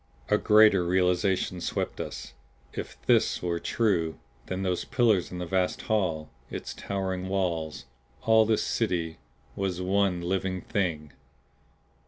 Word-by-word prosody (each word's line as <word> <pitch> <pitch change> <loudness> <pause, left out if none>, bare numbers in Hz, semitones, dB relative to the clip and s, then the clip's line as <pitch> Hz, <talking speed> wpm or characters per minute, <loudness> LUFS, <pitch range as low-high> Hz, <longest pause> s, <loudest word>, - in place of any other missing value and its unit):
A - - +4
greater 105 -3 +6
realization 90 0 +1
swept - - -2
us. - - -7 0.4
If - - -6
THIS - - +3
were 85 -1 -1
true, 90 -9 0 0.3
then 95 +1 -3
those 90 -2 0
pillars 115 -8 +2
in 90 - -5
the 90 - -3
vast 90 +1 0
hall, 85 -8 0 0.2
its - - -5
towering 95 -2 -3
walls 85 -7 -2 0.4
all 110 0 +6
this 110 -1 +2
City 85 -7 -1 0.4
was 95 -2 -2
one 95 0 +1
living 95 +1 -1
Thing! 80 -7 -2
95 Hz, 130 wpm, -28 LUFS, 85-100 Hz, 0.4 s, greater